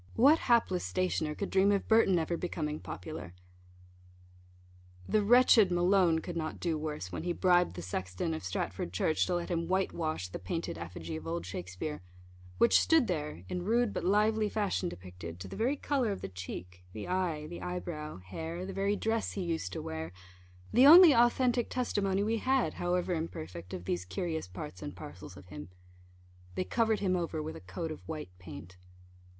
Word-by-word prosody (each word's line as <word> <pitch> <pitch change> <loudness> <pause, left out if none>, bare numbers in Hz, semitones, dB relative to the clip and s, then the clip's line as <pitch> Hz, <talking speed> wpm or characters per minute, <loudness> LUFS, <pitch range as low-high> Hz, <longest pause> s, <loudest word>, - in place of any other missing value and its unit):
what 285 +7 +6
hapless 225 -7 +3
stationer 170 -4 -1
could 200 - -4
dream 195 +1 +4
of 200 -1 0
Burton 220 -5 +5
ever 165 +1 0
becoming 155 -3 -3
popular? 90 -1 -7 1.7
The 215 - +3
wretched 230 -2 +6
Malone 175 -2 +3
could 175 - -6
not 155 -1 -3
do 170 -2 0
worse, 150 - -4
when - - -4
he 175 +1 -1
bribed 180 - +3
the 90 - -6
sexton 95 - -3
of 155 - -5
Stratford 90 -1 -3
church 155 - +1
to 180 - 0
let 175 -1 -3
him 170 -1 -1
white 190 +1 +1
wash 155 - -2
the - - -6
painted 130 - -3
effigy 85 -1 -6
of 80 +1 -9
old 85 +1 -3
Shakspeare, 95 - -5 0.6
which 115 - +6
stood 325 -5 +4
there, 150 - -3
in 180 - -3
rude 230 +2 +2
but - - -3
lively 210 +3 +2
fashion 200 -4 -1
depicted, 90 - -9
to 95 - -7
the - - -8
very 255 +6 0
colour 265 -7 0
of 195 - -4
the 95 - -5
cheek, 90 -1 -8
the 110 - -6
eye, 180 -5 -1
the 170 +3 -8
eye 180 0 -3
brow, 155 -4 -6
hair, 160 - -6
the 195 - -6
very 200 +2 +1
dress 225 +1 -1
he 195 - -3
used 165 - -2
to - - -4
wear 80 +1 -5 0.6
the 255 +4 +7
only 335 0 +10
authentic 240 0 +3
testimony 200 -6 0
we 225 +2 +1
had, 260 +2 +1
however 180 +1 0
imperfect, 90 - -5
of 90 - -6
these 90 0 -1
curious 160 - -3
parts 90 0 -8
and - - -6
parcels 90 +4 -10
of 90 - -14
him. 75 0 -8 0.9
They - - 0
covered 220 +2 +1
him 185 -2 +2
over 165 -3 -2
with 155 - -5
a - - -9
coat 95 - -5
of 155 - -7
white 155 - -6
paint. 90 0 -10
170 Hz, 185 wpm, -31 LUFS, -, 1.7 s, only